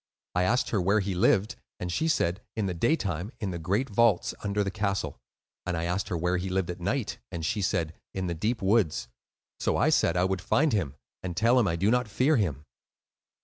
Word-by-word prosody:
I 90 - +2
asked 120 +8 +1
her 105 - +2
where 100 +4 +3
he 100 -1 -1
lived, 100 +5 +2 0.2
and 90 -1 -3
she 160 - 0
said, 95 - +1
'In 110 -3 -1
the 95 - -1
day 115 - +2
time, 95 - -3
in 100 -5 -2
the 85 - -4
great 100 +11 0
vaults 115 -4 +3
under 105 0 0
the 95 - -2
castle;' 100 -1 -2 0.4
and 90 -1 -2
I 80 - -2
asked 90 +3 -1
her 85 - -1
where 90 +2 +1
he 95 +2 -3
lived 95 -1 0
at 90 - -8
night, - - -2
and 85 -2 -4
she 110 +1 0
said, 85 -4 0 0.2
'In 95 -1 -3
the 85 - -1
deep 105 +6 -1
woods.' 95 - +2 0.5
So - - +1
I - - +3
said 85 - +3
I 90 - +3
would 95 0 0
find 145 - +2
him, 85 -10 0 0.3
and 90 -2 -5
tell 120 +4 +4
him 115 - +3
I 85 - +1
did 95 +6 +2
not 125 -1 +2
fear 130 +8 +2
him." 75 - -1
95 Hz, 230 wpm, -28 LUFS, 90-110 Hz, 0.5 s, tell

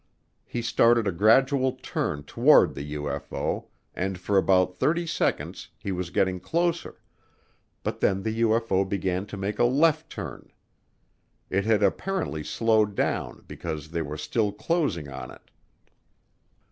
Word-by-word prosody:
He 120 - -4
started 115 -1 +3
a - - +2
gradual 130 +8 +4
turn 75 - -3
toward - - +5
the 75 +2 -6
UFO 75 -1 -3 0.3
and 95 0 -2
for 100 +3 -1
about 90 -1 +3
thirty 170 +2 +1
seconds 165 - -2
he 100 - -5
was 90 -2 -3
getting 95 +1 +1
closer, 170 - -2 0.8
but - - -3
then 95 0 +1
the 110 +1 -2
UFO 115 -4 +2
began 95 0 -2
to 105 - -7
make 100 +2 -3
a - - +5
left 155 +5 +3
turn. 85 - -8 1.0
It 95 +2 +1
had 110 -2 +3
apparently 100 - -1
slowed 110 +1 +2
down - - -2
because 75 -2 -6
they 85 0 -1
were 75 -1 -5
still 105 +5 0
closing 110 - -1
on 65 -1 -7
it. - - -15
100 Hz, 140 wpm, -26 LUFS, 90-120 Hz, 1.0 s, toward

